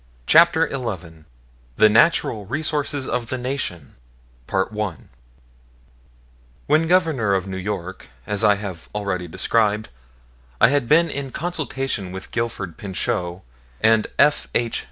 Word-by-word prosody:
CHAPTER 165 - +5
XI 90 - -5 0.5
THE 110 - +7
NATURAL 110 - +3
RESOURCES 145 +1 -1
OF 120 -2 -2
THE 130 - -2
NATION 125 - -4 0.6
When 100 -2 -2 1.8
Governor 160 - +2
of 95 -1 -1
New 95 -1 -6
York, 95 -5 -5 0.2
as 105 +1 -1
I 105 -1 +5
have 95 -5 -7
already 100 -4 -2
described, 105 +4 +1 0.7
I 110 - +6
had 140 -4 0
been 165 +3 +5
in 140 -3 -4
consultation 135 - -3
with 95 +1 -8
Gifford 110 -7 -3
Pinchot 90 -2 -3 0.4
and 110 -1 +3
F. 150 +1 +3
H. 120 -1 0
110 Hz, 115 wpm, -22 LUFS, 95-140 Hz, 1.8 s, THE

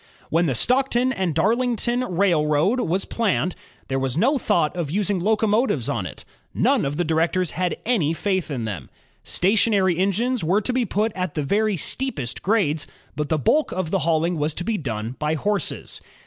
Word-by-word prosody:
When 170 +2 +3
the 135 - 0
Stockton 255 - +2
and 185 - -1
Darlington 240 +5 +1
Railroad 175 0 +2
was 190 -4 0
planned, 180 - 0 0.3
there 135 0 -1
was 135 +1 -1
no 265 - +3
thought 190 -10 +1
of 170 -5 -3
using 200 +2 0
locomotives 215 - +1
on - - -2
it. - - -11 0.3
None - - +2
of 140 +1 -2
the 175 - +1
directors 165 +2 +1
had 180 0 -1
any 210 -11 +2
faith 185 +1 -1
in 125 -6 -3
them. 95 -11 -6 0.3
Station 210 +4 +2
ary 190 -3 +3
engines 220 +5 0
were 180 +6 +3
to 250 - -1
be 250 -1 +1
put 215 +3 0
at 180 -3 -3
the 150 - -1
very 210 +6 +1
steepest 155 - -3
grades, 175 -8 +1 0.3
but 150 -1 -3
the 160 - +2
bulk 295 - +2
of 185 -3 -3
the 195 - +2
hauling 165 +1 +1
was 150 +1 -1
to 175 - -3
be 225 +4 -1
done 115 -3 -4
by 150 +1 0
horses. 200 +4 -2
180 Hz, 185 wpm, -23 LUFS, 155-220 Hz, 0.3 s, When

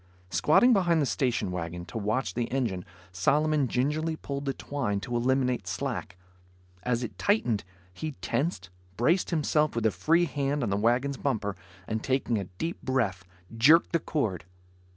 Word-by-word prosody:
Squatting 240 +11 +5
behind 175 -5 +3
the 145 - +2
station 125 -8 0
wagon, 85 0 -4
to 100 - -7
watch 110 +5 -1
the 120 -1 -2
engine, 115 -9 -1 0.3
Solomon 145 - +2
gingerly 150 +6 0
pulled 140 -2 -5
the 135 - 0
twine 120 -9 -2
to 120 +1 -4
eliminate 125 +1 +1
slack. 125 -9 -4 0.6
As 125 0 0
it 120 - -7
tightened, 125 - +1 0.3
he 155 - -5
tensed, 145 - -2 0.3
braced 165 +10 +2
himself 155 -3 +1
with 115 -1 -1
a 110 - +4
free 165 +8 +3
hand 140 -1 -1
on 110 - -1
the - - +2
wagon's 120 +6 +1
bumper, 105 -8 -1 0.3
and 110 0 -2
taking 130 -4 0
a 100 - -4
deep 95 - -5
breath, 115 -9 0 0.3
jerked 150 +9 +5
the 170 - +2
cord. 110 - -2
130 Hz, 160 wpm, -28 LUFS, 110-150 Hz, 0.6 s, Squatting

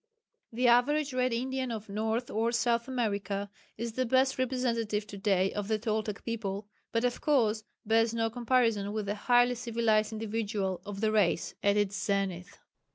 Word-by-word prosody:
The 245 +2 +1
average 275 +4 +3
Red 255 0 +1
Indian 260 +2 -2
of 220 -2 -5
North 220 +4 -2
or 225 +2 +1
South 235 +1 +1
America 205 -5 -2 0.3
is 230 0 -4
the 255 +2 0
best 260 +2 +2
representative 235 -5 0
to 205 - -9
day 195 -1 +2
of 205 -1 -3
the 220 0 +1
Toltec 215 -2 -3
people, 205 -3 -3 0.2
but 230 0 0
of 245 - -1
course 225 -7 +2 0.2
bears 225 +1 +3
no 225 -1 0
comparison 230 -4 +1
with 215 -1 -2
the 205 - -1
highly 245 +3 +3
civilized 230 -3 +1
individual 210 -4 -2
of 200 -1 -6
the 220 -1 +2
race 200 -6 +1
at 200 +1 +3
its 205 0 0
zenith. 195 -3 -2
225 Hz, 165 wpm, -30 LUFS, 205-245 Hz, 0.3 s, average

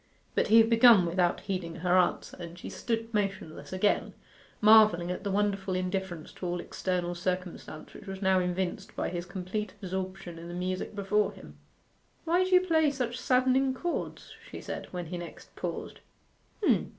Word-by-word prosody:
But - - +1
he 220 - +6
had 225 0 +7
begun 230 -4 +7
without 175 +1 +1
heeding 180 -4 -4
her 175 +1 +1
answer, 180 -1 +1
and 170 0 -8
she - - -8
stood 230 -1 -3
motionless 195 -6 -3
again, 185 +2 +1 0.4
marvelling 215 -5 +6
at 180 - -5
the 200 - -2
wonderful 195 -1 0
indifference 185 -3 -3
to 180 - -5
all 175 0 -2
external 175 0 -2
circumstance 180 -3 -4
which 200 - -12
was 195 0 -5
now 190 -1 +3
evinced 185 +3 -2
by - - -1
his 175 0 -5
complete 190 +2 -4
absorption 185 -2 -5
in 170 - -9
the 175 - -6
music 185 +3 -3
before 205 +1 +1
him. - - -14 0.7
'Why 345 +3 +3
do 370 - -2
you 365 -1 +6
play 320 -4 +3
such 250 -3 -3
saddening 260 +1 +2
chords?' 345 +5 -4 0.2
she - - -7
said, - - -6
when 180 -1 -5
he 175 +2 -5
next 170 -2 -10
paused. - - -5
190 Hz, 170 wpm, -29 LUFS, 180-220 Hz, 0.7 s, had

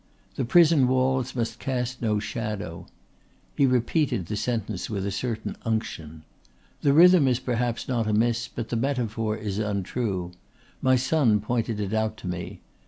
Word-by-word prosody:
The 130 - -2
Prison 155 -1 +5
Walls 130 0 +1
must 115 -1 -2
Cast 125 -1 -3
no 110 -3 +1
Shadow." 105 -5 -4 0.7
He 140 - +4
repeated 125 - +1
the 105 - -4
sentence 110 -3 -2
with 100 -3 -3
a 100 - -2
certain 110 +2 -3
unction. 80 -9 -3 0.6
"The 140 - +3
rhythm 170 0 +7
is 125 -2 +3
perhaps 120 -2 -2
not 120 -4 0
amiss 115 +2 +1
but 120 -2 -6
the - - -2
metaphor 115 -4 -1
is 105 -2 -4
untrue. 100 -2 -2 0.5
My 130 0 +4
son 130 -4 +2
pointed 115 0 -2
it 100 0 -3
out 110 0 0
to - - -8
me. 90 -1 -5
115 Hz, 155 wpm, -26 LUFS, 105-125 Hz, 0.7 s, rhythm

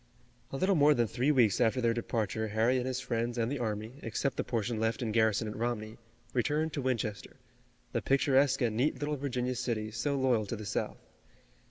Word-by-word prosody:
A 135 - -4
little 190 +6 +2
more 150 -3 +5
than 120 - +2
three 125 +6 +1
weeks 120 -7 +3
after 120 +2 +3
their 115 -2 +2
departure 110 -2 -2
Harry 110 +4 +2
and 125 - -3
his 130 -1 -1
friends 120 -1 -2
and 115 +1 0
the 145 - -2
army, 110 +3 -4
except 125 +4 -2
the - - -1
portion 115 -1 -2
left 115 +2 0
in 110 - -1
garrison 110 0 +2
at 105 - -5
Romney, 110 -1 -3 0.4
returned 150 +5 0
to 145 - -2
Winchester, 115 -5 -2 0.6
the - - -1
picturesque 135 -1 +3
and 115 -3 +1
neat 130 +7 +1
little 150 0 -1
Virginia 125 -3 -2
city 115 -3 -2
so 115 +6 -1
loyal 125 -5 +2
to 120 - -3
the 110 -1 -7
South. - - -3
120 Hz, 200 wpm, -31 LUFS, 110-130 Hz, 0.6 s, more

